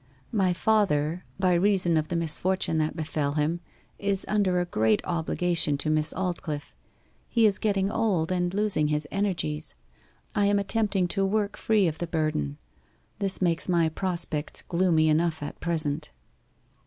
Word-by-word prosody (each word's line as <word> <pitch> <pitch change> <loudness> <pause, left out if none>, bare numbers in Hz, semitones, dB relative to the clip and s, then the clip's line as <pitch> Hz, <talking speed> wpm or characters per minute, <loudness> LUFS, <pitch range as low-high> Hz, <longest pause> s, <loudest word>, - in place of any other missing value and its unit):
My 195 -5 +2
father, 175 -5 +1
by 185 -2 +3
reason 180 -1 +3
of 155 -1 +1
the 175 - -3
misfortune 170 +1 0
that 155 0 -1
befell 150 -3 -2
him, 155 +3 0 0.4
is 200 -1 -1
under 195 -4 +1
a 175 - 0
great 110 -9 +2
obligation 170 -2 +1
to 155 +2 -1
Miss 155 0 +2
Aldclyffe. 170 -5 -4 0.5
He 230 -2 +3
is 205 -2 +2
getting 200 -2 0
old, 195 -8 0
and 175 -1 0
losing 200 -6 +1
his 150 0 -1
energies. 175 -6 -2 0.6
I 205 -2 +2
am 205 0 +3
attempting 200 -2 0
to 195 +2 0
work 205 +1 0
free 215 -4 +2
of 160 -1 -3
the 175 - -3
burden. 155 - -1 0.6
This 195 -2 0
makes 170 0 +1
my 170 -2 +3
prospects 170 -3 -2
gloomy 170 -3 +2
enough 155 0 +1
at 145 - -7
present. 155 - 0
175 Hz, 155 wpm, -26 LUFS, 155-195 Hz, 0.6 s, by